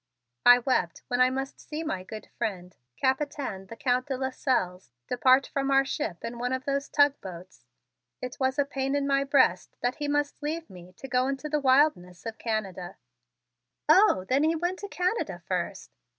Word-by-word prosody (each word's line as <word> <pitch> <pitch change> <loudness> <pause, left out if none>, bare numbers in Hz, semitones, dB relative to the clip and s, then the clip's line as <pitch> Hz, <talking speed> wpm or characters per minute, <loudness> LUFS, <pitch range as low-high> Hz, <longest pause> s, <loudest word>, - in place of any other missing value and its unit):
"I 245 0 +10
wept 245 -8 -1
when 245 0 +1
I 255 - +6
must 270 +1 -4
see 310 +1 -6
my 190 - -3
good 215 +4 -9
friend, 180 -4 -4 0.2
Capitaine, 265 -7 -1
the 230 - -9
Count 250 +2 0
de 270 -2 -2
Lasselles, 250 - -1 0.2
depart 255 +2 +4
from 275 0 -2
our 275 0 +4
ship 265 - -4
in 235 +1 -6
one 250 +1 -1
of 260 0 -3
those 280 0 -1
tug 285 -1 +3
boats. 180 -7 -11 0.5
It 250 0 -6
was 260 0 +1
a 285 - +3
pain 270 0 -2
in 285 -1 0
my 275 0 +2
breast 270 - +2
that 245 +1 -1
he 295 -1 -3
must 290 0 -1
leave 320 0 -4
me 180 -1 -12
to 270 - -10
go 250 0 +1
into 275 +2 -3
the 300 0 +1
wildness 260 - +2
of 225 -1 -6
Canada." 195 -6 -3 0.9
"Oh, 310 - +5
then 270 +3 +2
he 320 +1 +3
went 350 +3 -2
to 405 - -6
Canada 365 +3 -2
first?" - - -3
260 Hz, 185 wpm, -27 LUFS, 220-285 Hz, 0.9 s, I